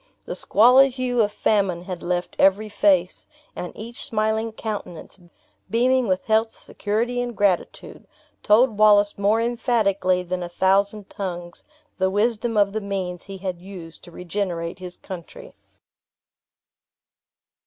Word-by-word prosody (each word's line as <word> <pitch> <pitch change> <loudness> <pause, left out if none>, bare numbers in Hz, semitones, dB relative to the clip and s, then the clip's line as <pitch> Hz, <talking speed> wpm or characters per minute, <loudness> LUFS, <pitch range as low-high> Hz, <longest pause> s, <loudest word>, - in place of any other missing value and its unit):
The - - -5
squalid 250 +5 +5
hue 250 -2 0
of 210 -1 +1
famine 195 -5 0
had 180 -1 -6
left 175 0 -3
every 200 +3 +3
face, 190 -3 +1 0.3
and 180 - -5
each 235 +4 -6
smiling 220 -2 -1
countenance, 210 -5 -7 0.5
beaming 250 +2 +2
with 185 -1 -1
health, 220 +1 +2
security, 230 +4 -3
and 240 -3 -5
gratitude, 195 -3 -1 0.3
told 215 +1 +3
Wallace 205 -1 +5
more 205 +3 +2
emphatically 220 -6 +1
than 180 0 -4
a 175 - -5
thousand 195 +3 +1
tongues, 175 -3 -6 0.4
the 190 0 +2
wisdom 225 +3 0
of 200 -1 +3
the 220 - -2
means 190 -3 -4
he 195 -1 -8
had 185 -2 -5
used 180 -4 -11
to - - -12
regenerate 175 -1 -4
his 180 -1 -8
country. 180 -3 -10
205 Hz, 130 wpm, -23 LUFS, 185-220 Hz, 0.5 s, squalid